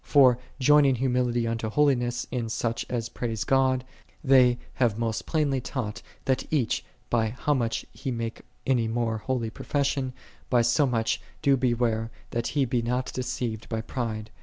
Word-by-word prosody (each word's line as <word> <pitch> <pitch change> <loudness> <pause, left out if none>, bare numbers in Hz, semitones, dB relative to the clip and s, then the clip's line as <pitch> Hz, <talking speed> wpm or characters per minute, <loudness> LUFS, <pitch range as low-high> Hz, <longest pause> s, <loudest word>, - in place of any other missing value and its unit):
For 130 -4 +5 0.2
joining 140 0 +5
humility 125 -1 +1
unto 115 -1 -2
holiness 120 -2 +2
in 120 -3 -2
such 115 0 -2
as 115 -2 -2
praise 115 -3 -3
God, 130 -1 +2 0.4
they 130 -3 +5 0.2
have 115 -4 +3
most 115 -2 -2
plainly 145 -5 +1
taught, 120 -3 -4 0.2
that 130 -1 +1
each, 135 -8 +1 0.3
by 115 -2 +2
how 150 +2 +1
much 115 -4 -1
he 135 - -5
make 115 -2 -3 0.2
any 120 -4 +2
more 115 -1 -1
holy 115 -1 -2
profession, 135 -1 -1 0.4
by 120 -2 +4
so 130 +5 +3
much 115 -3 0 0.2
do 140 -2 +5
beware 120 -3 +1 0.2
that 120 0 -1
he 140 - +4
be 120 -1 0
not 125 +2 -1
deceived 125 -3 -3
by 115 -1 -1
pride. 110 -2 -4
120 Hz, 160 wpm, -27 LUFS, 115-130 Hz, 0.4 s, For